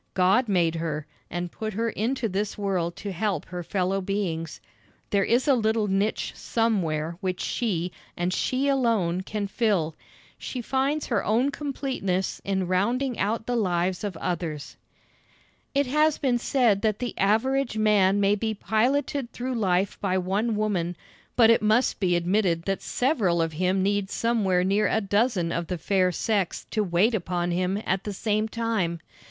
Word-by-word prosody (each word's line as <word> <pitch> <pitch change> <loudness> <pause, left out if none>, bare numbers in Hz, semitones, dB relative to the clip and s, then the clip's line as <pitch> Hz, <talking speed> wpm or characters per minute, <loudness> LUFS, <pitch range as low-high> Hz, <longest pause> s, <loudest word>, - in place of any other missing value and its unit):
God 195 +7 +3
made 170 -4 +2
her, 160 -3 -3 0.2
and 175 0 -4
put 220 -1 -5
her 230 +3 -1
into 235 +3 -1
this 200 +1 -2
world 185 -4 -1
to 200 - -5
help 190 -3 -1
her 180 -1 -6
fellow 190 +2 -1
beings. 180 -5 -3 0.5
There 200 -1 +3
is 240 +7 +2
a 280 - +6
little 220 -3 +1
niche 200 +2 0
somewhere 170 -8 -1
which 185 -2 -2
she, 185 -7 -1 0.3
and 175 +1 0
she 260 +7 0
alone, 225 -10 +1
can 205 +2 -3
fill. 195 -7 0 0.4
She 255 - -5
finds 270 +5 0
her 235 -5 0
own 240 +7 +2
completeness 265 -11 -2
in 190 -1 -1
rounding 235 +8 0
out 220 +2 0
the 245 - -1
lives 180 -4 0
of 200 -5 -3
others. 165 -5 -4 1.0
It 280 0 +3
has 300 +3 +2
been 250 -3 +1
said 235 -6 +2
that 215 -2 +1
the 245 0 -4
average 235 +5 +1
man 205 -2 +4
may 200 0 +3
be 220 +1 -1
piloted 250 +5 0
through 255 +1 -4
life 195 -4 0
by 190 -2 +1
one 200 +5 0
woman, 180 -5 -1 0.4
but 230 -2 +6
it 230 - +4
must 220 +4 +2
be 180 -3 +2
admitted 175 -1 +1
that 195 +1 -2
several 225 - +1
of 165 -1 0
him 185 +3 +1
need 200 0 0
somewhere 205 -7 +1
near 200 +3 +2
a - - +2
dozen 205 -4 +1
of 170 -1 -2
the 180 - -3
fair 185 +2 +2
sex 195 +1 -1
to 215 - +1
wait 190 +5 +2
upon 175 -3 -1
him 185 +3 0
at 190 +1 0
the 205 - -4
same 215 +1 0
time. 220 -7 -1
200 Hz, 165 wpm, -26 LUFS, 180-230 Hz, 1.0 s, a